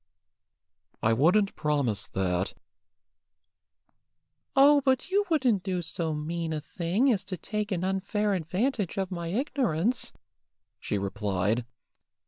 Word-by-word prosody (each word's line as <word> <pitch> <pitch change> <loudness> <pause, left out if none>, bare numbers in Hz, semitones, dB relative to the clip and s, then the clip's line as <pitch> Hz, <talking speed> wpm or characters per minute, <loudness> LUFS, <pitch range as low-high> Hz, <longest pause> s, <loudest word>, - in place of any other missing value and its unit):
"I 110 - +4
wouldn't 180 - +3
promise 140 -9 0
that." 90 -1 -1 2.0
"Oh, 285 +1 +7
but 265 +6 +1
you 405 +1 +3
wouldn't 255 - +2
do 180 -2 -2
so 160 -1 -2
mean 165 +2 -3
a 155 - -2
thing 180 - +1
as 195 -3 -2
to 185 -2 -5
take 210 +3 -3
an 180 -2 -1
unfair 195 +2 0
advantage 190 - -1
of 190 -1 -1
my 170 -2 -4
ignorance," 235 - 0 0.7
she 105 - -2
replied. 100 +3 -1
180 Hz, 115 wpm, -28 LUFS, 150-215 Hz, 2.0 s, Oh